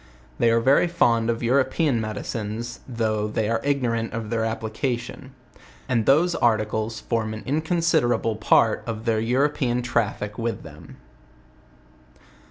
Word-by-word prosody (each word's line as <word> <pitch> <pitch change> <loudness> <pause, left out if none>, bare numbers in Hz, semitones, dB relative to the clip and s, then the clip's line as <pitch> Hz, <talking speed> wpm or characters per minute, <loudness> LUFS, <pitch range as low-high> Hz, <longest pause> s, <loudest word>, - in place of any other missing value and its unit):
They 115 - +4
are 115 0 +3
very 135 +8 +4
fond 115 -9 +2
of 115 +1 -1
European 130 +1 +2
medicines, 110 +1 -5
though 110 -4 -1
they 105 0 -1
are 115 0 0
ignorant 120 -5 0
of 115 -1 -5
their 115 -1 0
ap 110 0 -3
118 120 +3 -1
JOURNAL 120 0 -10
OF - - -13
plication: - - -27 0.3
and 120 -4 +1
those 165 +6 +4
articles 110 -2 0
form 110 -2 -2
an 110 - -8
inconsiderable 155 -6 +1
pa 110 - +4
r - - +4
t - - -15
of 110 0 -5
the 110 -2 +1
European 125 0 +1
traffic 105 -3 -2
with 115 0 -3
them. 80 0 -13
115 Hz, 160 wpm, -24 LUFS, 110-130 Hz, 0.3 s, They